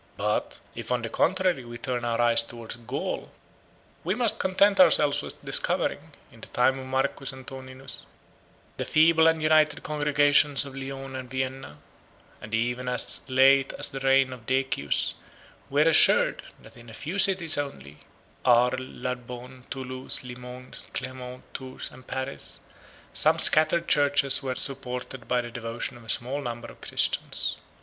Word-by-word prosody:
But - - -2
if, 115 +1 -7
on 125 -2 0
the 115 - -3
contrary, 185 -6 +1
we 120 0 -9
turn 120 0 -3
our 115 0 -1
eyes 120 -1 +5
towards 115 -1 -8
Gaul, 120 +4 -5 0.7
we 185 +4 -1
must 225 -2 +2
content 195 +2 +3
ourselves 150 -5 +5
with - - -4
discovering, - - +2 0.3
in - - -17
the - - -10
time 130 +2 +1
of 130 - -8
Marcus 135 +1 -1
Antoninus, 130 0 -9 0.8
the - - -2
feeble 160 +1 +4
and 160 -1 +2
united 155 0 +3
congregations 145 -1 +3
of 135 -1 -9
Lyons 135 0 -7
and 130 -1 -7
Vienna; 130 - -4 0.6
and 110 +1 -4
even 120 +2 -2
as 125 -2 +1
late 135 +1 +4
as - - 0
the 135 - -5
reign 135 -1 +3
of 115 -3 -13
Decius 130 - 0 0.6
we 145 +2 +3
are 165 - +4
assured, 160 - +5 0.2
that - - -16
in 120 -1 -14
a 110 - -11
few 175 +7 -4
cities 185 -6 +3
only, 75 - -7 0.4
Arles, 125 +1 +4
Narbonne, 125 0 -7
Thoulouse, 130 -1 -4
Limoges, 125 0 -10
Clermont, 130 -1 -6
Tours, 130 -1 -7
and 130 0 -16
Paris, 130 +1 -5 0.5
some - - +3
scattered 155 +2 +5
churches 145 -1 +3
were 130 -2 -3
supported 130 -3 -4
by 125 0 +1
the 120 0 -8
devotion 115 +2 -5
of 120 - -14
a 115 - -12
small 130 +6 +1
number 120 -3 -6
of - - -19
Christians. - - 0
130 Hz, 155 wpm, -26 LUFS, 125-145 Hz, 0.8 s, eyes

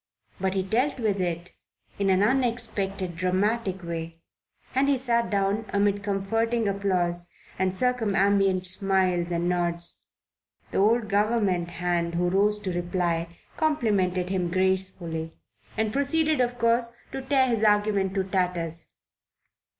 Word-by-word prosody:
But 190 0 0
he 190 - +1
dealt 250 +8 0
with 205 -4 0
it 175 0 -3 0.5
in 200 -1 +2
an 190 +1 +4
unexpected, 205 -7 0
dramatic 190 +2 0
way, 165 -1 -5 0.5
and 270 +2 +2
he 280 - +3
sat 235 -2 0
down 200 +2 0
amid 200 0 +1
comforting 225 +3 0
applause 180 -3 -1 0.3
and 190 0 +2
circumambient 200 -4 +2
smiles 185 -2 +1
and 170 0 -1
nods. 170 -1 -2 0.7
The - - 0
old 220 +3 +3
government 205 -4 +1
hand 170 -1 -1
who 175 +1 +1
rose 205 +3 +2
to 190 -3 -3
reply 175 -1 -1 0.2
complimented 200 - +1
him 185 -2 0
gracefully 185 -3 -1 0.4
and 220 -1 0
proceeded 305 +1 +2
of 245 0 0
course 235 0 +2 0.2
to 270 - -4
tear 265 0 +3
his 230 -4 0
argument 205 -2 +2
to 195 - +1
tatters. 180 -4 -2
195 Hz, 130 wpm, -26 LUFS, 180-225 Hz, 0.7 s, an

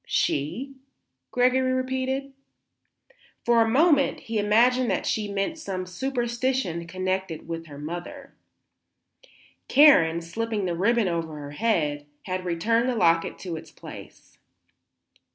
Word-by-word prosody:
"She?" 250 - -1 0.5
Gregory 255 +1 +2
repeated. 260 +1 -2 1.1
For 235 -1 +4
a 225 - +3
moment 285 +2 +3
he 225 -4 -3
imagined 235 +4 +3
that 190 - -1
she 210 -2 -1
meant 200 +11 -2
some 185 -8 -4
superstition 235 -3 -2
connected 185 -1 -3
with 165 0 -5
her 145 -2 -10
mother. 175 - -7 1.3
Karen, 215 - +6
slipping 215 +4 -3
the 175 - -1
ribbon 220 +4 +2
over 165 -3 -2
her 145 -1 -8
head, 150 -6 0 0.2
had 185 0 -4
returned 230 +8 +1
the 250 - 0
locket 165 -6 +2
to 175 -3 -4
its - - -10
place. - - -13
210 Hz, 120 wpm, -25 LUFS, 170-255 Hz, 1.3 s, Karen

